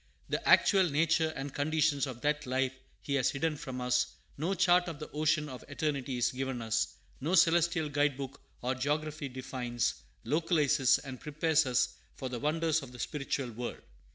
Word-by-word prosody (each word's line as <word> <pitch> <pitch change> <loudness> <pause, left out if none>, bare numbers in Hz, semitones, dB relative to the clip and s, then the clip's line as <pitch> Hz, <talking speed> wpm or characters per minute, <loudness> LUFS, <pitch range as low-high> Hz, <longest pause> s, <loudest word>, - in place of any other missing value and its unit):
The - - -1
actual 190 -3 +6
nature 160 +2 +2
and 135 0 -5
conditions 150 -1 +1
of 125 -2 -7
that 150 0 0
life 130 +1 0 0.3
He 140 - -3
has 135 -3 +3
hidden 150 +3 -1
from 130 -3 -6
us, 125 0 +2 0.3
no 170 +7 -1
chart 180 -1 +4
of 165 -3 -5
the 150 - -8
ocean 155 0 +1
of 130 -3 -8
eternity 140 -3 -2
is 120 - +2
given 130 -1 -3
us, 115 -1 -1 0.2
no 160 +7 0
celestial 170 -2 +4
guidebook 145 -2 -1 0.2
or 125 +1 +1
geography 150 +2 -2
defines, 125 -2 -2 0.3
localizes, 150 -5 +3
and 130 -2 -8
prepares 155 0 +2
us 125 -1 +1 0.2
for 130 - -5
the 125 -1 -4
wonders 160 +2 +1
of 135 -3 -10
the 125 - -11
spiritual 135 0 -3
world. 120 +2 -5
145 Hz, 170 wpm, -31 LUFS, 130-155 Hz, 0.3 s, actual